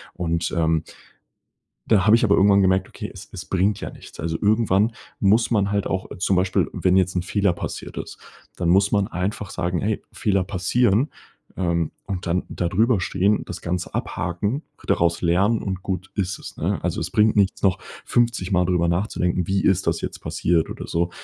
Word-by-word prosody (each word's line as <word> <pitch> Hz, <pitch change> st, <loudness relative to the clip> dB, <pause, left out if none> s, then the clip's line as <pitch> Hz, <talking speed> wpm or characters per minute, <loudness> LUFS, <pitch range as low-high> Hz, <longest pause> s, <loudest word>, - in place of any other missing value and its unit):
und, 85 Hz, -1 st, -1 dB
ähm 80 Hz, -1 st, +2 dB, 1.0 s
dann 100 Hz, -4 st, +4 dB
habe 110 Hz, +1 st, +7 dB
ich 120 Hz, -, +2 dB
aber 100 Hz, -3 st, +4 dB
irgendwann 100 Hz, 0 st, +5 dB
gemerkt: 95 Hz, 0 st, +2 dB
„Okay -, -, -7 dB
es -, -, -11 dB
es -, -, -7 dB
bringt 95 Hz, +2 st, +1 dB
ja -, -, -4 dB
nichts.“ -, -, -14 dB
Also, 80 Hz, 0 st, -2 dB
irgendwann 110 Hz, 0 st, +3 dB, 0.3 s
muss 110 Hz, +5 st, +3 dB
man 100 Hz, -3 st, +2 dB
halt 100 Hz, -1 st, 0 dB
auch 95 Hz, 0 st, -3 dB
zum 95 Hz, +2 st, +1 dB
Beispiel 90 Hz, 0 st, +2 dB
wenn 95 Hz, 0 st, +2 dB
jetzt 95 Hz, -1 st, +1 dB
'n 90 Hz, -, +1 dB
Fehler 100 Hz, 0 st, +1 dB
passiert -, -, -6 dB
ist, -, -, -6 dB, 0.4 s
dann 85 Hz, -, 0 dB
muss 95 Hz, +3 st, +4 dB
man 100 Hz, -1 st, +2 dB
einfach 100 Hz, +1 st, -3 dB
sagen: 90 Hz, -1 st, -2 dB
„Ey, 105 Hz, +1 st, -1 dB
Fehler 100 Hz, -3 st, +1 dB
passieren,“ 105 Hz, +7 st, +1 dB, 0.5 s
ähm, 85 Hz, -3 st, 0 dB
und 95 Hz, -3 st, -4 dB
dann 90 Hz, +2 st, +1 dB
da 85 Hz, -, -2 dB
drüber 110 Hz, +2 st, +2 dB
stehen, 100 Hz, +3 st, +1 dB
das -, -, -7 dB
Ganze 90 Hz, +1 st, -3 dB
abhaken, 100 Hz, -, -2 dB, 0.2 s
daraus 85 Hz, 0 st, +2 dB
lernen 95 Hz, +6 st, +2 dB
und 95 Hz, -2 st, -4 dB
gut 95 Hz, -1 st, -3 dB
ist 95 Hz, -3 st, -2 dB
es, -, -, -10 dB
ne? -, -, -1 dB
Also, -, -, -1 dB
es -, -, -4 dB
bringt 105 Hz, 0 st, +3 dB
nichts 100 Hz, -2 st, +2 dB
noch 95 Hz, -3 st, +3 dB, 0.3 s
fünfzigmal 100 Hz, -7 st, +1 dB
drüber 85 Hz, -1 st, +1 dB
nachzudenken: 90 Hz, -1 st, 0 dB
„Wie 95 Hz, 0 st, +1 dB
ist 95 Hz, 0 st, +2 dB
das 85 Hz, 0 st, +1 dB
jetzt -, -, -5 dB
passiert“ 85 Hz, -2 st, 0 dB
oder -, -, -7 dB
so, 85 Hz, +1 st, 0 dB
95 Hz, 190 wpm, -23 LUFS, 90-105 Hz, 1.0 s, habe